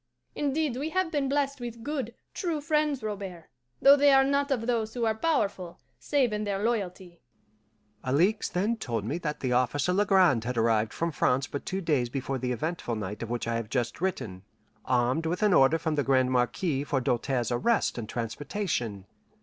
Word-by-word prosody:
Indeed, 290 -2 -1
we 290 +4 -2
have 370 0 0
been 285 -4 0
blessed 280 0 0
with 235 -1 -7
good, 265 -5 -3 0.2
true 335 -5 -2
friends, 300 -3 0
Robert, 195 -6 -5 0.3
though 280 +1 +8
they 285 0 +5
are 270 0 +6
not 280 +1 +1
of 245 -5 0
those 230 -2 -1
who 240 -2 0
are 220 - +2
powerful, 205 - -1 0.2
save 265 -6 +1
in 210 0 -1
their 200 -2 -1
loyalty." 190 -6 -3 0.8
Alixe 175 +12 +2
then 210 +6 0
told 115 - -3
me 145 +9 -2
that 150 -3 -4
the 130 -2 0
officer 130 +7 +1
Legrand 185 - +4
had 125 +1 -3
arrived 110 -1 +2
from 170 0 -2
France 135 -2 +1
but 140 - -6
two 190 0 -2
days 145 -8 +1
before 135 +1 -3
the 125 0 -2
eventful 125 -1 -3
night 105 -1 -5
of 115 - -5
which 120 -1 -3
I 115 0 0
have 115 -2 -5
just 120 +3 -2
written, 110 - -3 0.4
armed 130 +5 +1
with 175 +5 -1
an 210 -3 +4
order 135 +1 +5
from 160 -1 -2
the 145 -1 +1
Grande 130 -1 +2
Marquise 135 +4 0
for 140 - +1
Doltaire's 125 0 0
arrest 205 - +1
and 110 -2 -6
transportation. 120 - -3
175 Hz, 190 wpm, -28 LUFS, -, 0.8 s, though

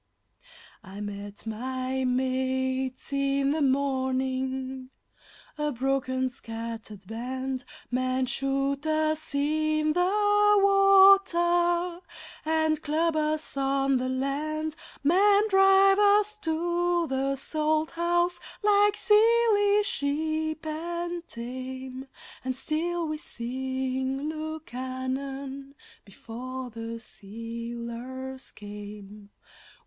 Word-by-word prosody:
I 195 0 -10
met 205 0 -7
my 255 +3 -3
mates 260 +1 -1
in 275 0 +1
the 310 +1 0
morning, 260 -1 -1 0.7
a 300 0 0
broken, 260 0 0
scattered 225 -4 -7
band. 255 +4 -4 0.3
Men 255 +1 0
shoot 275 +2 0
us 310 -1 0
in 310 +1 +1
the 415 +3 +4
water 360 -3 +5 0.4
and 315 -1 +1
club 315 +2 0
us 310 -1 -1
on 275 0 +1
the 255 +1 -2
land; 300 +4 -2 0.3
Men 400 +7 +4
drive 390 0 +6
us 415 +1 +4
to 345 0 0
the 270 -1 -1
Salt 310 +3 0
House 345 +1 +1 0.2
like 415 0 +4
silly 420 -2 +4
sheep 315 -1 -1
and 340 +2 -4
tame, 260 +2 -7 0.4
And 260 0 -2
still 330 +5 -2
we 305 0 -3
sing 260 +2 -3
Lukannon 275 -2 -5 0.3
before 250 +5 -7
the 230 +1 -6
sealers 235 +4 -7
came. 205 0 -10
275 Hz, 90 wpm, -27 LUFS, 255-335 Hz, 0.7 s, drive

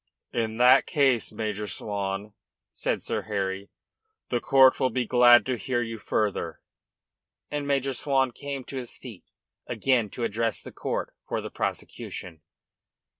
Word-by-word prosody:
"In 110 -2 -1
that 125 +1 +6
case, 135 -5 +2
Major 105 -1 -3
Swan," 100 +1 -4 0.4
said - - -2
Sir - - -1
Harry, 100 -2 -3 0.6
"the 120 - +1
court 130 +1 +5
will 130 - +3
be 125 +1 -1
glad 120 0 +7
to 130 -1 -1
hear 120 -2 0
you 115 -1 -6
further." 100 -6 -1 0.9
And 145 -1 -2
Major 135 -1 +1
Swan 135 -1 +1
came 140 0 -6
to 135 - -7
his 125 -2 -6
feet 115 -8 -11 0.4
again 125 -5 +1
to 120 - -5
address 115 0 0
the - - -10
court - - -3
for - - -1
the - - -6
prosecution. 85 -3 -5
120 Hz, 145 wpm, -27 LUFS, 105-130 Hz, 0.9 s, glad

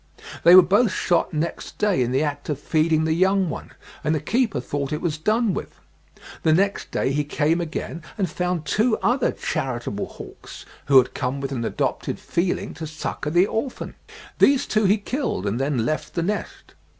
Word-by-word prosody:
They 175 +1 +9
were 185 - +10
both 205 +5 +3
shot 175 -2 +1
next 160 +2 -4
day, 205 -9 +2
in 125 0 0
the 135 +3 +2
act 145 0 -4
of 150 - -1
feeding 155 +1 +1
the 160 0 +1
young 190 0 +2
one, - - -8 0.3
and 155 +1 +1
the - - 0
keeper 225 - 0
thought 140 +3 -3
it 150 - -1
was 160 -3 -2
done 215 +3 +1
with. - - -6 0.6
The 160 - +3
next 195 +4 +1
day - - 0
he 145 +2 0
came 155 +3 0
again 170 0 -5 0.2
and 195 -3 +1
found 180 0 -2
two 215 - +2
other 245 +1 +2
charitable 120 -6 -3
hawks, - - -11 0.2
who 140 -1 +6
had 125 -1 +4
come 130 +2 -2
with 135 0 -4
an 125 -4 -2
adopted - - -2
feeling 175 +1 -1
to 160 - -6
succour 150 -1 -4
the 175 +3 +5
orphan. 235 +5 -4 0.5
These 275 -1 +5
two 215 -1 +1
he 200 +3 +4
killed, 230 - -3
and 105 +4 -1
then 135 -4 0
left 155 +3 -3
the 170 - 0
nest. 210 +4 -4
160 Hz, 190 wpm, -23 LUFS, 145-195 Hz, 0.6 s, were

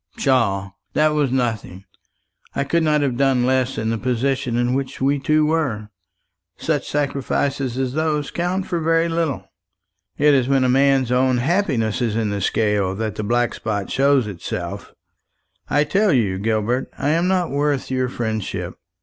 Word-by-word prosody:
"Pshaw! 100 -8 +1 0.2
that 155 0 +3
was 150 -4 0
nothing. 110 -7 -2 0.7
I 140 - +1
could 170 +4 +1
not 150 -2 +2
have 130 -4 0
done 135 -2 +2
less 130 0 +1
in 110 +1 -1
the 115 - -2
position 125 0 -1
in 120 +1 +1
which 135 0 -3
we 140 +2 +1
two 155 +2 +2
were. 135 -10 -1 0.7
Such - - -2
sacrifices 140 -2 -1
as 130 -1 -1
those 155 -1 -1
count 180 +2 -1
for 175 - -2
very 165 +1 +2
little. 165 -4 -1 0.7
It 150 0 +4
is 130 -3 +2
when 135 -1 +3
a - - +3
man's 135 -1 +3
own 130 0 +3
happiness 130 - 0
is 115 -3 0
in 110 -2 0
the 100 -1 -2
scale 105 -2 +1
that 110 0 -3
the 105 - -4
black 120 +2 +1
spot 105 -3 -3
shows 135 -2 +3
itself. 100 -5 -6 0.8
I 145 +1 +3
tell 195 +7 +2
you, 105 - +1
Gilbert, 110 +4 0
I 145 - -1
am 165 +3 +2
not 185 -2 +1
worth 145 -2 -1
your 130 -1 0
friendship. 110 -4 -4
130 Hz, 165 wpm, -21 LUFS, 115-145 Hz, 0.8 s, It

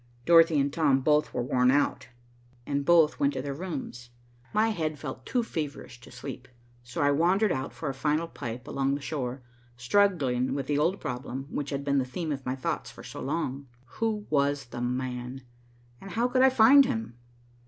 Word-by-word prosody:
Dorothy 165 -2 +6
and 140 0 0
Tom 140 -5 +3
both 150 +2 +2
were 125 - -2
worn 125 -1 +2
out, 135 -2 +1 0.6
and 140 0 -1
both 160 0 +4
went 140 0 +2
to - - -3
their 140 -1 -3
rooms. 135 -7 -6 0.4
My 215 +2 +2
head 155 -7 -2
felt 130 -3 -7
too 245 -2 +1
feverish 145 - -5
to - - -14
sleep, 130 +1 -8 0.4
so 125 +4 -3
I 145 - +4
wandered 180 +7 +3
out 130 -2 -2
for 155 - -6
a 135 - -1
final 150 +4 0
pipe 120 -4 -7
along 135 -1 0
the 145 - -6
shore, 130 -3 -4 0.3
struggling 130 -4 +2
with 140 -2 -2
the 145 +1 0
old 175 +6 +1
problem 125 +1 -5
which 145 - -3
had 140 -1 -3
been 140 -1 +2
the 130 - 0
theme 160 +5 -4
of 135 -2 -4
my 130 - -1
thoughts 130 - -3
for - - -12
so - - -8
long, 140 -2 -3 0.2
who 215 - -3
was 140 -1 +1
"the 120 0 -7
man," 125 +1 -3 0.6
and 195 - -9
how 230 +6 +1
could 255 +1 +2
I 265 - +7
find 260 +3 +7
him? 225 - -3
140 Hz, 195 wpm, -28 LUFS, 130-170 Hz, 0.6 s, I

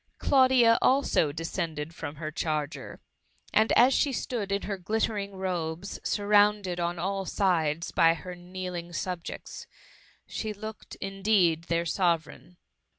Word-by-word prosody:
Claudia, 255 -4 +5
also, 260 - +3
descended 165 -1 -4
from 155 -3 -6
her 155 0 -5
charger, 155 -1 -3 0.5
and 220 +1 +4
as 255 +3 +6
she 280 - +2
stood 230 -5 -3
in 200 0 0
her 200 - -3
glittering 205 0 -2
robes, 180 -1 -3
surrounded 205 -3 +2
on 175 0 -1
all 195 +3 -2
sides 170 -5 0
by 165 0 +4
her 180 +2 -8
kneeling 180 -1 -6
subjects, 175 0 -5 0.6
she 215 -1 -4
looked, 215 +1 -9
indeed, 195 -4 +1
their 170 0 0
Sovereign. 170 0 -1
185 Hz, 125 wpm, -28 LUFS, 170-205 Hz, 0.6 s, as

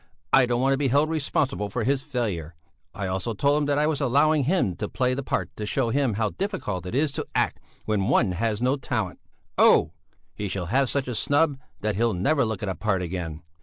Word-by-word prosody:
I 130 -2 +6
don't 120 0 0
want 135 +1 +3
to 135 - -1
be 145 - +2
held 145 +5 +2
responsible 140 -8 -1
for 115 +3 -2
his 135 +3 +1
failure; 105 - -3 0.4
I 100 - -5
also 95 +4 -2
told 140 +7 +2
him - - +1
that 145 -1 +1
I 150 - +3
was 155 -2 0
allowing 145 +2 +3
him 150 - +1
to 105 - -3
play 125 -1 0
the 135 - -2
part 135 - -3
to 105 - -3
show 125 +1 +1
him 135 -5 +1
how 110 0 0
difficult 145 - -3
it 90 - -4
is 145 +1 +2
to - - -5
act - - +1 0.3
when 105 -2 0
one 105 -7 +3
has 105 +4 -1
no 130 +3 +2
talent. 135 - -3 0.4
Oh! 75 - +5 0.4
He 105 - -4
shall 95 -2 -3
have 135 -1 +3
such 140 -2 -1
a 125 - -2
snub 145 +5 +1 0.2
that 105 -2 -1
he'll 115 -2 +2
never 140 - +2
look 110 -3 -3
at 105 - -1
a - - -1
part 95 -2 -1
again. 85 -2 -5
125 Hz, 230 wpm, -25 LUFS, 100-140 Hz, 0.4 s, I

